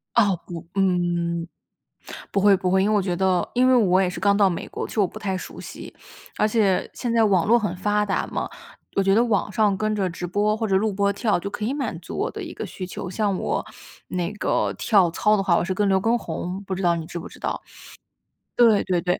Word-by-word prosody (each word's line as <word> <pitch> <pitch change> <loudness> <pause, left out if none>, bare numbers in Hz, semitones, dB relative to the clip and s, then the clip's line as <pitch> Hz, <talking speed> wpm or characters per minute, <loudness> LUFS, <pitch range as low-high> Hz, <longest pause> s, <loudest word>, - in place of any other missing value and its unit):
哦， 200 -7 +3
不 170 -2 -8
嗯， 175 -3 0 0.9
不 195 - +2
会， 200 -1 +6
不 180 0 -1
会。 190 0 +3
因 205 - +2
为 - - +2
我 200 - +2
觉 180 -2 -1
得 185 -1 +1
因 255 +1 +4
为 260 - +5
我 190 -6 +4
也 185 - +2
是 180 - -5
刚 200 -1 +3
到 200 -2 +5
美 175 - -4
国， - - -5
其 - - -10
实 215 - +1
我 195 - +4
不 - - -10
太 190 -2 -2
熟 - - -8
悉。 - - -9 0.4
而 215 - +3
且 210 -4 +1
现 240 -2 -3
在 225 -1 +4
网 190 -5 +3
络 235 +2 +5
很 195 -5 -2
发 210 +2 0
达 195 - -1
嘛， - - -3 0.5
我 195 - +3
觉 195 0 +3
得 230 - +5
网 205 -3 0
上 205 -2 +2
跟 215 +1 -1
着 195 -3 0
直 175 +1 -5
播 210 +4 +1
或 220 0 -1
者 190 -2 +2
录 210 +1 +1
播 200 +1 +1
跳， 205 -1 0
就 200 +3 -5
可 210 - -4
以 255 +6 -1
满 285 - -3
足 - - -8
我 - - -1
的 - - -7
一 - - -7
个 - - -5
需 185 - -6
求。 180 0 -6
像 200 -1 0
我 - - -2 0.4
那 180 +2 -2
个 - - 0
跳 195 -6 +3
操 210 +4 +2
的 195 - 0
话， 175 -3 +3
我 - - +1
是 185 +1 -2
跟 205 +1 +1
刘 190 0 +3
耕 230 +3 +2
宏， 180 +2 -5
不 190 -1 -3
知 190 - -4
道 170 -1 +3
你 165 - -4
知 175 - -6
不 - - -8
知 - - -15
道。 - - -3 0.9
对 230 -4 +5
对 180 -2 +1
对。 180 0 0
195 Hz, 275 characters per minute, -23 LUFS, 180-210 Hz, 0.9 s, 会